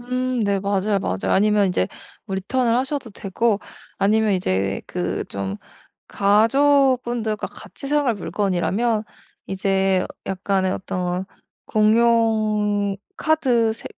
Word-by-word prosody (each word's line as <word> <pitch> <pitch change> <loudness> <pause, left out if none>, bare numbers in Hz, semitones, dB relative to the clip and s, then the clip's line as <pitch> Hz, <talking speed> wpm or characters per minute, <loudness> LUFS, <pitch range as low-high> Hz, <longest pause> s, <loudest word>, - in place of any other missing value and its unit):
음 250 0 -2
네. 200 -1 +1
맞아요, 200 +1 0
맞아요. 95 - -1
아니면 210 0 +3
인제 100 - 0 0.4
리턴을 230 +5 0
하셔도 265 -2 -2
되고 205 +2 0 0.4
아니면 215 +2 +3
이제 95 - 0
그 180 0 -3
좀 100 0 -4 0.5
가족분들과 240 +1 +2
같이 275 - -11
사용할 285 -4 +1
물건이라면 200 +5 0 0.4
이제 190 -1 +1 0.2
약간의 190 0 0
어떤 180 0 -3 0.4
공용 215 -2 +2 0.2
카드 250 -8 +2
새 225 - -11
210 Hz, 235 characters per minute, -22 LUFS, 190-235 Hz, 0.5 s, 아니면